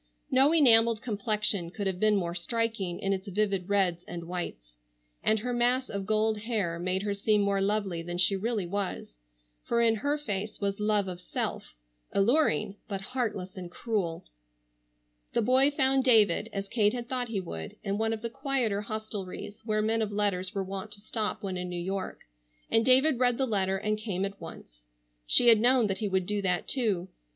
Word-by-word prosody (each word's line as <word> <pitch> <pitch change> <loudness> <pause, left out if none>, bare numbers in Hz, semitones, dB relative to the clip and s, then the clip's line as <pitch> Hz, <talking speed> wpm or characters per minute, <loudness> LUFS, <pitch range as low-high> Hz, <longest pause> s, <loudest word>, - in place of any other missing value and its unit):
No 270 +3 +5
enameled 230 -7 +5
complexion 210 -4 -1
could 200 +3 -5
have 190 -2 -2
been 215 0 +3
more 175 -3 -1
striking 200 -1 -2
in 195 0 0
its 190 +1 -5
vivid 200 -1 -1
reds 185 -4 +1
and 170 -1 -6
whites, 115 - -6 0.5
and 220 - +2
her 245 +3 -3
mass 245 +2 +1
of 200 -1 -4
gold 215 0 +1
hair 205 -7 -1
made 185 +2 -1
her 205 -1 -1
seem 210 +1 +2
more 200 -1 +1
lovely 195 -4 -1
than 175 +1 -5
she 180 +2 +3
really 210 0 -1
was, 180 - -4 0.4
for 235 - 0
in 225 -1 +3
her 285 +6 0
face 210 -7 -4
was 200 0 -2
love 210 -2 +1
of 180 -1 -6
self, 120 - -4 0.4
alluring, 200 - +2
but 195 -2 -4
heartless 210 -7 -3
and 180 -2 -7
cruel. 185 -4 -3 1.1
The - - +1
boy 260 +4 +5
found 270 -2 +3
David, 220 -4 +4
as 195 -1 -4
Kate 210 0 +2
had 240 -1 -5
thought 250 -1 -2
he 220 -4 -2
would, 80 - -6
in 200 0 -2
one 225 0 +1
of 225 0 -4
the 230 - -2
quieter 260 -6 -1
hostelries 210 -2 -6
where 215 -1 +1
men 225 +1 +1
of 210 -1 -1
letters 200 -1 -1
were 195 - -1
wont 195 +2 -6
to 205 - -11
stop 215 0 -3
when 190 -2 -3
in 180 0 -4
New 180 - -5
York, 190 +2 -4 0.5
and 225 - +4
David 260 +2 +4
read 245 -2 +3
the 265 - +1
letter 195 -5 0
and 215 +1 -1
came 195 -3 -2
at 200 0 -7
once. - - -11 0.5
She 240 - +6
had 225 -2 +7
known 245 0 +5
that 195 -2 -2
he 215 - -1
would 190 -1 0
do 205 +1 -1
that, 180 -2 0
too. 205 -9 +1
205 Hz, 195 wpm, -28 LUFS, 190-230 Hz, 1.1 s, had